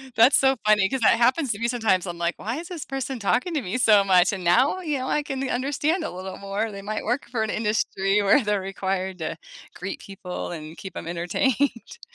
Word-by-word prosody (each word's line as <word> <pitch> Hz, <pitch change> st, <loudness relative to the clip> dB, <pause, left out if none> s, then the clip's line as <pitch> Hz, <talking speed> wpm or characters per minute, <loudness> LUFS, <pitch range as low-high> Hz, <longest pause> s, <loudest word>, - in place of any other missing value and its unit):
That's 235 Hz, +5 st, +6 dB
so 265 Hz, 0 st, +3 dB
funny 210 Hz, -2 st, +4 dB
'cause 265 Hz, -, -1 dB
that 225 Hz, -, +5 dB
happens 255 Hz, +3 st, +2 dB
to 205 Hz, -, -3 dB
me 235 Hz, -, 0 dB
sometimes. 220 Hz, -7 st, +1 dB
I'm 175 Hz, -2 st, -5 dB
like, 170 Hz, 0 st, -1 dB
"Why 230 Hz, +6 st, -4 dB
is 345 Hz, -, -8 dB
this 345 Hz, -5 st, -6 dB
person 270 Hz, -1 st, -4 dB
talking 250 Hz, -, 0 dB
to 295 Hz, -, 0 dB
me 195 Hz, +3 st, -3 dB
so 215 Hz, -5 st, +5 dB
much?" 185 Hz, 0 st, +4 dB
And 190 Hz, -3 st, -5 dB
now, 255 Hz, -, +3 dB
you 300 Hz, -5 st, -1 dB
know, 260 Hz, 0 st, -4 dB
n -, -, +1 dB
I 295 Hz, -, -1 dB
can 270 Hz, -1 st, -3 dB
understand 290 Hz, +6 st, 0 dB
a -, -, -4 dB
little 185 Hz, +1 st, -7 dB
more. 200 Hz, +3 st, -3 dB
They 200 Hz, -1 st, -8 dB
might 215 Hz, +2 st, -4 dB
work 240 Hz, +2 st, -2 dB
for 230 Hz, -3 st, -1 dB
an 220 Hz, -, -2 dB
industry 210 Hz, -2 st, 0 dB
where 210 Hz, +6 st, +4 dB
they're 210 Hz, -1 st, 0 dB
required 190 Hz, -1 st, -3 dB
to 160 Hz, -, -4 dB, 0.4 s
greet -, -, -6 dB
people, 195 Hz, -3 st, -7 dB
and 155 Hz, 0 st, -8 dB
keep 190 Hz, -3 st, -8 dB
'em -, -, -6 dB
entertained. 230 Hz, -, -1 dB
215 Hz, 230 wpm, -24 LUFS, 190-265 Hz, 0.4 s, That's